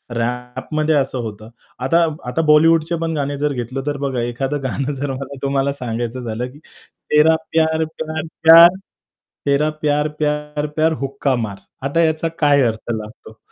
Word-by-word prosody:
रॅपमध्ये 125 +6 -1
असं 135 -2 0
होतं. 110 0 -8 0.3
आता 150 +7 +2 0.3
आता 165 - 0
बॉलिवूडचे 165 +2 +4
पण 165 0 -1
गाणे 145 -1 -2
जर 145 0 0
घेतलं 130 +2 -4
तर 145 -1 -1
बघा 135 -3 -2
एखादं 135 +4 -3
गाणं 140 +2 -2
जर 140 0 -3
मला 135 +1 -6
तुम्हाला 140 0 0
सांगायचं 120 -1 -4
झालं 115 +2 -3
की 145 - -15 0.5
तेरा 155 +2 +5 0.2
प्यार, 160 0 +2
प्यार, 160 0 -5 0.2
प्यार 170 +2 +9 0.7
तेरा 145 +2 +2
प्यार, 150 0 +1
प्यार, 150 0 -1
प्यार 160 +1 +2
हुक्का 135 -1 -1
मार. 105 -4 -4 0.3
आता 165 +4 +1
याचा 160 +1 +1
काय 145 -2 +4
अर्थ 110 +1 -4
लागतो? 110 0 -9
140 Hz, 155 wpm, -19 LUFS, 125-155 Hz, 0.7 s, प्यार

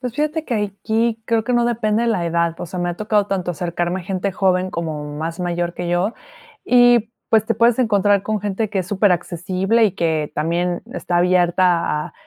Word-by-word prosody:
Pues, 250 -3 -5
fíjate 305 +2 -1
que 250 - -2
aquí 220 +2 -1
creo 230 -2 0
que 250 - -1
no 240 -1 +3
depende 225 -2 0
de 235 - +1
la 185 -7 0
edad, 170 0 0
o - - -4
sea, 180 +2 -6
me 175 0 -1
ha - - -4
tocado 210 -1 +1
tanto 185 -3 -2
acercarme 175 +1 -2
a - - -10
gente 190 +1 -2
joven, 185 -1 +1
como 160 -4 -4
más 165 +3 -4
mayor 175 -1 -2
que 175 -1 -4
yo, 175 +6 +1 0.5
y, 245 -2 +4 0.2
pues, 220 -1 +3
te 230 - +1
puedes 235 0 +3
encontrar 205 -4 +3
con 215 0 -2
gente 205 +2 -2
que 195 -3 0
es 180 - -6
superaccesible, 190 +2 +1
y 205 - +2
que 160 -3 -1
también 170 +3 -1
está 175 -9 -1
abierta 175 -3 +2
a - - -14
190 Hz, 205 wpm, -20 LUFS, 175-220 Hz, 0.5 s, y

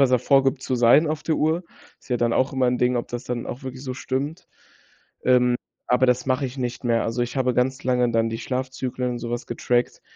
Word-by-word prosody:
was 130 -2 +4
er 125 - +4
vorgibt 135 0 +3
zu 130 - -1
sein 120 +7 +5
auf 155 0 -3
der 160 - +1
Uhr. 160 +4 +1 0.4
Ist - - -21
ja 125 - +1
dann 120 0 +1
auch 130 +3 +1
immer 130 -1 +1
'n 125 - 0
Ding, 125 0 +2
ob 120 - -3
das 120 0 -5
dann 120 -1 -4
auch 130 +2 -7
wirklich 130 0 -7
so 130 -2 -4
stimmt, 140 +6 -3 0.8
ähm, 125 -1 +4 0.3
aber 125 +1 +4
das 125 0 +2
mache 130 +1 +1
ich 130 +2 -8
nicht 125 0 -4
mehr. 115 -1 +2
Also, 115 +2 -1
ich 120 +3 -4
habe 130 -1 +2
ganz 130 +3 0
lange 125 -1 +2
dann 115 0 +2
die 115 - -4
Schlafzyklen 130 0 -3
und 120 - -4
sowas 120 +1 -4
getrackt, 120 +1 -1
125 Hz, 235 wpm, -24 LUFS, 120-130 Hz, 0.8 s, sein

